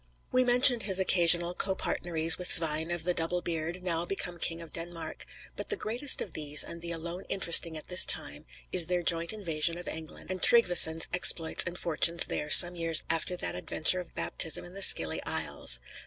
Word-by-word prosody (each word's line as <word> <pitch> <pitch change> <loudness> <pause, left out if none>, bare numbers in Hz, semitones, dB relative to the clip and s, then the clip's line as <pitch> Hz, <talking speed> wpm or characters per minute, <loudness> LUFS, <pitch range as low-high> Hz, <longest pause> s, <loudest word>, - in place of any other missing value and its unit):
We 255 0 0
mentioned 245 0 +5
his 190 -2 0
occasional 175 -2 +4
copartneries 170 -3 -1
with 180 - -7
Svein 160 0 +2
of 175 -1 -5
the 180 +1 -2
Double 170 +1 -2
beard, 170 +1 -7
now 170 -2 -4
become 175 -1 -8
King 165 +1 -2
of 165 -1 -14
Denmark, 170 0 -9 0.3
but - - -10
the 430 - -3
greatest 250 - -1
of 185 - -7
these, 150 -1 +3
and 170 - -11
the 170 0 -8
alone 170 +3 -9
interesting 170 -3 +2
at 155 - -12
this 180 0 +4
time, - - -3 0.2
is 175 -3 +4
their 180 -1 -4
joint 165 0 0
invasion 170 -5 -3
of 175 - -12
England, 160 +3 -10
and 185 - -8
Tryggveson's 175 -9 +2
exploits 170 -2 +1
and 170 +1 -8
fortunes 170 0 -1
there 150 - -7
some 175 +3 +8
years 165 -2 +3
after 165 +2 -3
that - - -5
adventure 185 +3 -1
of 180 - -13
baptism 160 - -1
in 175 - -14
the 195 - -10
Scilly 80 - +2
Isles. - - -1
170 Hz, 190 wpm, -26 LUFS, 165-180 Hz, 0.3 s, some